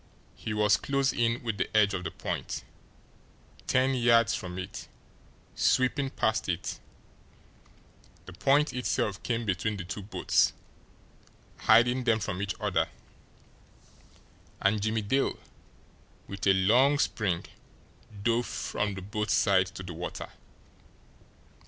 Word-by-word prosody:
He - - -6
was 105 0 +3
close 140 -1 0
in 115 0 0
with 110 -3 -3
the - - 0
edge 105 -2 +4
of 95 -2 -3
the - - -3
point, - - -4 1.0
ten 130 +1 +3
yards 115 -2 +4
from 90 0 -5
it, 95 -1 -7 0.7
sweeping 135 +2 +2
past 110 -7 -1
it 90 +1 -3 1.5
the 95 - -10
point 140 - +2
itself 110 -5 -1
came 115 -1 -2
between 105 +2 -1
the 95 - -5
two 100 +4 -6
boats, 100 +3 +1 1.0
hiding 125 +2 +4
them 115 -2 +3
from 95 -2 -3
each 100 -1 -2
other - - 0 1.7
and 100 +1 +2
Jimmie 110 +1 0
Dale, 135 +7 0 0.9
with 100 0 -4
a 95 - +7
long 120 +10 +4
spring, 100 -10 0 0.8
dove 120 +1 +1
from 105 -2 -2
the 95 - -7
boat's 105 +2 -1
side - - +3
to - - -9
the - - -7
water. - - -6
110 Hz, 125 wpm, -29 LUFS, 100-120 Hz, 1.7 s, a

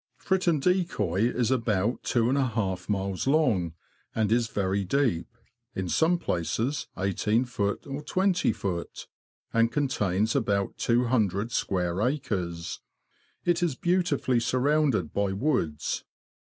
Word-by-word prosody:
Fritton 185 -5 +1
Decoy 125 - +1
is 125 -1 0
about 115 -3 +1
two 120 -2 +1
and 130 - +2
a 135 -2 +2
half 95 -6 -2
miles 95 +1 -1
long, 120 - +2 0.4
and 110 -2 +1
is 115 0 +3
very 100 -2 -1
deep 115 -5 +1 0.5
(in 95 -1 -2
some 165 - +3
places 115 - -1
i8ft. 105 +6 0 0.3
or 140 +1 -5
2oft.), 150 - -1 0.5
and 115 0 +3
contains 110 -7 0
about 100 -6 0
200 115 -3 +1
square 90 -3 -1
acres. 100 - -2 0.6
It 175 0 +2
is 170 -6 +1
beautifully 170 -8 +1
surrounded 130 - +1
by 100 -1 0
woods. 95 - -1
115 Hz, 115 wpm, -27 LUFS, 95-140 Hz, 0.6 s, is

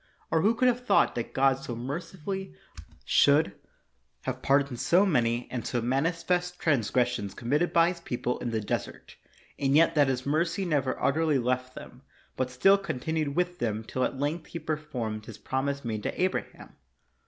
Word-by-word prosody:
Or 160 - +3
who 220 +6 +3
could 255 +2 +3
have 250 0 +1
thought - - +3
that 120 - -4
God 135 0 +3
so 130 -3 -6
mercifully 170 +9 -5 0.5
should 145 +2 +4 0.7
have - - -4
pardoned 140 -3 +2
so 185 +4 +4
many 120 - +1
and 125 -3 -3
so 120 - -1
manifest 170 +8 0
transgressions 125 - 0
committed 150 +9 0
by 170 0 +5
his 180 -1 -5
people 125 -5 -3
in 120 - -3
the 110 -1 -1
desert, 100 - -5 0.4
and 135 0 +2
yet 165 +2 +5
that 145 -3 +4
his 130 -1 -1
mercy 170 +6 0
never 145 -6 0
utterly 155 0 +2
left 125 +1 -1
them, 125 - -11 0.3
but 130 -1 -1
still 195 +11 +4
continued 160 -3 -2
with 180 0 -1
them 110 -2 -1
till 130 +3 -2
at 135 - -1
length 150 +4 -2
he - - -6
performed 130 -9 -4
his 110 - -9
promise 140 +1 -2
made 110 -2 -2
to - - -4
Abraham? 185 +1 -3
140 Hz, 170 wpm, -28 LUFS, 125-170 Hz, 0.7 s, by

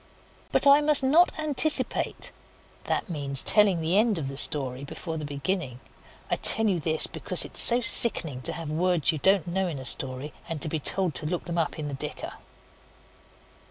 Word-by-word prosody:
But - - +1
I 280 +1 +5
must 295 -2 +2
not 315 +7 +2
anticipate 310 0 +2 0.5
(that - - -3
means 140 -6 -1
telling 200 -5 +2
the 170 +5 0
end 220 -3 0
of 140 -4 -6
the 135 - -9
story 135 -2 -2
before 160 +3 -8
the 155 - -7
beginning. 145 -2 -5 0.5
I - - 0
tell 225 - +3
you 185 -4 -1
this 155 +1 -2
because - - -3
it - - -14
is - - +3
so 240 +1 +7
sickening 160 - +4
to - - -3
have 165 -3 -8
words 175 0 0
you 155 - -7
don't 190 0 +1
know 190 +2 -3
in 160 -5 -7
a 130 - -10
story, 130 +3 -1 0.2
and 165 -2 -6
to - - +3
be 160 - -4
told 180 +3 0
to 150 - -5
look 175 +1 -6
it 170 - -6
up 165 -3 -3
in 155 -2 -7
the 145 - -8
dicker). 135 - -7
165 Hz, 195 wpm, -24 LUFS, 145-200 Hz, 0.5 s, so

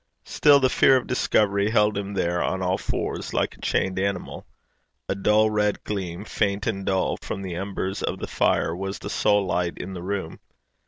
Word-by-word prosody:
Still, 145 -1 +5
the 130 - +3
fear 130 +1 +5
of 130 - -3
discovery 100 -4 +1
held 105 -1 +3
him 100 0 -4
there 85 -2 0
on 95 0 -1
all 90 +1 0
fours, - - -3
like - - 0
a - - -20
chained 95 0 0
animal. 100 -1 -3 0.6
A - - 0
dull 105 +2 +3
red 105 -1 0
gleam, 95 -2 -4
faint 100 -1 -1
and 100 -3 -2
dull, 95 -1 0
from 100 - -6
the 95 -2 -5
embers 95 +1 -3
of - - -2
the - - -4
fire, 80 - +1
was 95 +2 -4
the 100 - -7
sole 105 -1 +2
light 90 -1 -1
in 95 +1 -6
the 90 - -6
room. 95 -2 -4
100 Hz, 195 wpm, -24 LUFS, 95-105 Hz, 0.6 s, Still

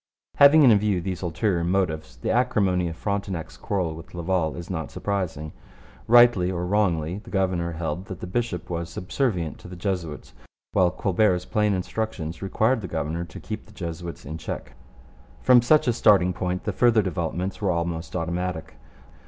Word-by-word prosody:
Having 145 +2 +8
in 120 -5 +7
view 100 -3 +1
these 90 0 -4
ulterior 85 +1 0
motives, 80 -7 -1
the 65 - -2
acrimony 100 -7 +2
of 80 - -6
Frontenac's 100 -3 -3
quarrel 90 -5 -2
with 80 +2 -11
Laval 85 -2 0
is 85 0 -7
not 80 -5 -4
surprising. 90 -7 -3 0.6
Rightly 120 -6 +6
or 90 -1 -2
wrongly, 90 -3 0
the - - -14
governor 90 -4 0
held 80 +2 -4
that 95 - -7
the - - -5
bishop 90 -2 -2
was 85 -1 -4
subservient 90 - -2
to - - -12
the 90 - -9
Jesuits, 90 -5 -4 0.4
while 90 -1 +4
Colbert's 90 0 +1
plain 105 -1 +1
instructions 90 -4 -4
required 110 +5 +1
the 95 - -5
governor 80 +1 -3
to 85 - -10
keep 110 -1 -7
the - - -16
Jesuits 85 -2 -6
in 80 +3 -6
check. - - -6 0.7
From 125 -1 +7
such 150 +4 +4
a 120 - +3
starting 95 -5 +4
point 90 +1 -3
the 105 - -2
further 115 0 +4
developments 90 +1 -3
were 100 - +1
almost 85 -1 -2
automatic. 85 -4 -3
90 Hz, 170 wpm, -25 LUFS, 85-105 Hz, 0.7 s, Having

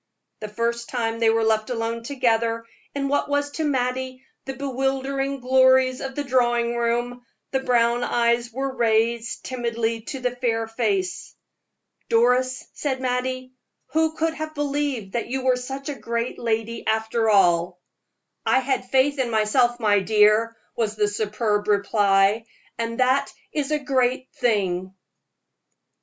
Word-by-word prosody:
The 215 - -5
first 235 +2 -2
time 230 -2 -2
they 225 -1 +4
were 225 0 +2
left 220 0 +1
alone 230 -1 -2
together 230 -3 0 0.3
in 275 -1 -1
what 285 +1 0
was 285 0 0
to 320 - -3
Mattie 260 -2 -1 0.2
the 270 - -5
bewildering 270 0 -2
glories 260 0 +4
of 270 -1 -5
the 290 - -2
drawing 240 -3 +1
room, 240 +1 -1 0.3
the 265 - +1
brown 240 -2 +2
eyes 235 0 +1
were 265 +2 -3
raised 230 0 +1
timidly 230 -2 -2
to 270 - -5
the 250 -1 -2
fair 225 -2 -1
face. 205 -5 -2 0.7
"Doris," 250 +2 +2
said 270 -3 -2
Mattie, 255 0 -2 0.4
"who 320 0 +2
could 325 0 0
have 310 0 -6
believed 285 -8 -2
that 235 - -2
you 260 +2 -3
were 255 -1 +4
such 270 +2 -6
a 295 - -2
great 235 -1 -3
lady 225 0 -2
after 220 +1 +1
all?" 175 -3 +3 0.6
"I - - +3
had 260 -1 -1
faith 270 +2 +2
in 255 -2 +1
myself, 240 +2 +2
my 210 -3 +3
dear," 215 +3 +3 0.2
was 220 -2 -1
the 210 -1 +2
superb 210 0 -1
reply, 200 +1 +3 0.3
"and 230 +1 -3
that 260 +2 +2 0.2
is 295 -2 -1
a 305 - +2
great 260 -2 0
thing!" 190 -6 0
240 Hz, 145 wpm, -23 LUFS, 225-260 Hz, 0.7 s, they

